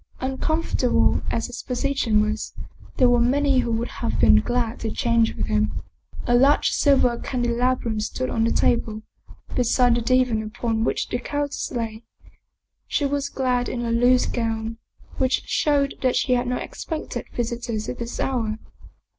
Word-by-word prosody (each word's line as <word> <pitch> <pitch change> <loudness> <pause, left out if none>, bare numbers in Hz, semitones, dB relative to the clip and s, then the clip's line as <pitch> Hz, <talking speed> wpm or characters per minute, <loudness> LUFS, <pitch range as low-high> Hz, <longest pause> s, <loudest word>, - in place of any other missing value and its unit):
Uncomfortable 265 0 +1
as 230 - -1
his 245 - -7
position 250 -4 +1
was, 215 +1 -3 0.4
there 255 - +5
were 245 0 +4
many 270 +2 +3
who 235 - 0
would 230 +1 -1
have 235 - -1
been 105 - +6
glad 240 - -1
to 225 - -3
change 235 -1 +1
with - - -2
him. 215 -1 -1 0.4
A 240 - +1
large 270 +4 +4
silver 260 -4 +3
candelabrum 240 -2 -1
stood 255 +4 -2
on 225 - 0
the 230 - +2
table, 220 -2 +1 0.5
beside 245 0 +3
the 235 - +1
divan 250 -2 +2
upon 225 +1 -2
which - - -1
the 245 - -2
countess 290 +3 -3
lay. 225 -3 -4 0.9
She 290 - 0
was 280 0 -1
clad 250 -3 0
in 240 -1 -3
a 230 - -1
loose 245 +2 +4
gown, 225 -1 -3 0.4
which 260 0 +1
showed 285 -2 +1
that 255 -2 +2
she 255 - +2
had 245 0 +1
not 250 0 -2
expected 320 -2 -6
visitors 235 -2 -3
at 250 - -5
this 235 0 -5
hour. 225 -5 -1
245 Hz, 160 wpm, -23 LUFS, 230-255 Hz, 0.9 s, been